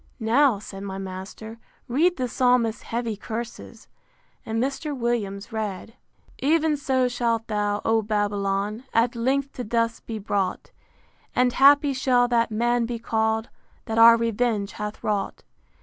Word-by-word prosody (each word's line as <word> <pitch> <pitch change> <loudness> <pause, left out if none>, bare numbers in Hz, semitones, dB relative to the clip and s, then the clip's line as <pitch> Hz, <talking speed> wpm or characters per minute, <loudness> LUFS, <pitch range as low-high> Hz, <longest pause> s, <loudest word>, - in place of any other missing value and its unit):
Now, 240 +2 +3
said 195 -1 -9
my 195 -1 -5
master, 195 +4 -8 0.3
read 325 +9 +2
the 255 -1 -1
Psalmist's 245 -2 +2
heavy 230 -1 -3
curses: 225 +3 -7 0.6
and 225 0 -3
Mr. 275 +3 -2
Williams 225 -3 -2
read: 215 -3 -4
IX. 230 - -24 0.6
Ev'n 320 -2 +1
so 260 -2 +1
shalt 235 -2 -1
thou, 205 -1 -1
O 225 0 +3
Babylon! 205 +1 -1
At 235 +2 +2
length 270 +4 0
to 250 - -5
dust 230 +1 -1
be 225 - -4
brought: 195 -2 -2 0.6
And 250 -1 +3
happy 285 +1 +5
shall 255 -2 +2
that 235 -1 +2
man 235 +2 +1
be 240 0 -3
call'd, 220 0 -1 0.4
That 225 0 -1
our 230 0 +9
revenge 230 -2 0
hath 210 0 -6
wrought. 205 -2 -2
230 Hz, 145 wpm, -24 LUFS, 210-245 Hz, 0.6 s, our